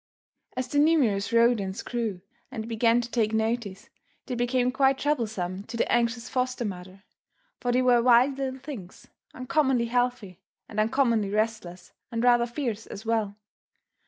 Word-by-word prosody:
As 255 0 -2
the 290 +3 0
numerous 255 -11 +2
rodents 230 -4 +2
grew 225 -7 -3 0.3
and 225 -4 -6
began 230 +1 +2
to 240 0 -8
take 220 -2 0
notice, 220 -3 -2 0.4
they 255 - -5
became 245 +1 +1
quite 270 0 +3
troublesome 220 -11 -2
to 230 +1 -7
the - - 0
anxious 235 0 +1
foster 255 -1 -2
mother, 190 0 -8 0.6
for 245 - -1
they 250 +1 +2
were 245 -1 +4
wild 250 +3 +4
little 265 -1 -3
things, 240 -11 -9 0.3
uncommonly 260 -2 +1
healthy 235 -6 -1 0.3
and 215 - -5
uncommonly 225 -2 +2
restless 210 -4 -3 0.2
and 230 0 -2
rather 240 -1 +4
fierce 235 -4 -4
as 200 - -9
well. 220 -3 0
235 Hz, 150 wpm, -26 LUFS, 215-255 Hz, 0.6 s, were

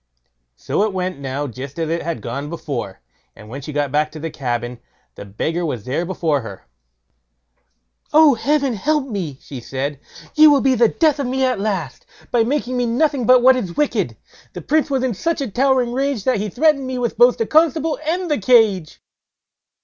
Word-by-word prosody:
So - - -2
it 210 -1 0
went 185 -4 -3
now 140 +1 -4
just 135 +3 -8
as 165 -1 -2
it 170 - -1
had 165 -10 -4
gone 140 +5 -5
before, 135 - -5 0.3
and 105 -1 -14
when 135 +4 -7
she 150 - -7
got 145 -2 -1
back 150 +1 0
to 155 - -8
the 165 +1 -5
cabin, 120 -3 -4 0.3
the - - -10
beggar 160 - -3
was 125 -10 -3
there 155 +7 -2
before 160 -6 -1
her. 100 -5 -10 1.5
"Oh, 310 -2 +6
Heaven 275 +2 0
help 290 +6 0
me", 180 - -4
she 135 - -8
said; 135 +3 -4 0.3
"you 310 0 +7
will 285 -2 +4
be 265 -1 +3
the 240 -1 +4
death 305 +3 +1
of 275 - -1
me 260 +1 0
at 255 -5 0
last, 190 -10 -3 0.2
by 240 -2 +3
making 255 0 -2
me 245 -1 0
nothing 260 0 0
but 255 -1 +6
what 260 +1 +7
is 195 -9 -4
wicked. 295 - 0 0.4
The - - -7
Prince 310 0 +1
was 265 -2 0
in 255 -2 0
such 330 - -2
a 270 -6 -3
towering 255 0 +1
rage 270 -4 -1
that 255 0 +1
he 210 +1 -3
threatened 275 - +2
me 260 0 -3
both 240 -2 -3
with 245 +1 +6
the 225 - 0
constable 315 +2 +2
and 325 - -1
cage." 200 -8 +3
220 Hz, 195 wpm, -19 LUFS, -, 1.5 s, you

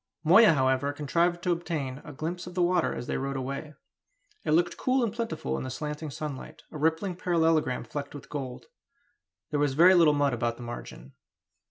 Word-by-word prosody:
Moya, 190 +5 +7
however, 130 0 +1
contrived 170 +4 0
to 180 - +1
obtain 150 -6 -3
a - - -9
glimpse 165 +5 -5
of 180 - -9
the 180 - +1
water 175 -1 +2
as 120 - -5
they - - -2
rode 135 0 -3
away. 140 +3 -5 0.7
It - - -4
looked 175 +2 +2
cool 255 0 +1
and 220 -3 -1
plentiful 225 - -3
in - - -4
the 130 - -5
slanting 150 +3 -5
sunlight 140 0 -7
a - - -7
rippling 160 +4 0
parallelogram 165 -7 +1
flecked 145 0 -6
with 145 - -10
gold. 135 -4 -6 0.9
There 150 - 0
was 145 -2 +1
very 175 +5 +7
little 165 -5 +5
mud 145 -2 +2
about 120 0 -1
the 120 - -9
margin. 120 - -8
150 Hz, 190 wpm, -28 LUFS, 135-175 Hz, 0.9 s, Moya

